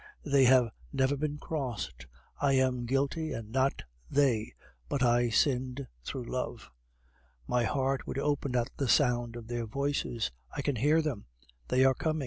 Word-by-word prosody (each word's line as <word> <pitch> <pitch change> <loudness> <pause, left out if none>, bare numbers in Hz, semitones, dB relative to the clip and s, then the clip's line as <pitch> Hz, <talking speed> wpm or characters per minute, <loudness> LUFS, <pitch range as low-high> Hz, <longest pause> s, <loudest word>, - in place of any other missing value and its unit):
They 140 -2 +4
have 125 -3 +5 0.2
never 130 +1 +2
been 150 +1 -2
crossed. 125 - -4 0.3
I 140 -1 +3
am 130 -2 +2
guilty, 140 +5 0
and 110 -1 -6
not 135 +2 +1 0.3
they 125 -6 +2 0.3
but 135 - 0
I 120 0 +3
sinned 130 +2 +1 0.2
through 125 - -4
love. 120 - -4 0.7
"My 120 - +1
heart 135 +1 0
would - - -4
open 140 -2 0
at 120 -1 0
the 135 -4 -1
sound 120 -4 +3
of 120 -1 -7
their 120 -1 -3
voices. 140 - -1 0.3
I - - -2
can 140 -4 0
hear 150 +7 +3
them; 135 -10 -3 0.4
they 130 +1 +4
are 135 - +5
coming. 155 +4 -1
130 Hz, 160 wpm, -30 LUFS, 120-140 Hz, 0.7 s, have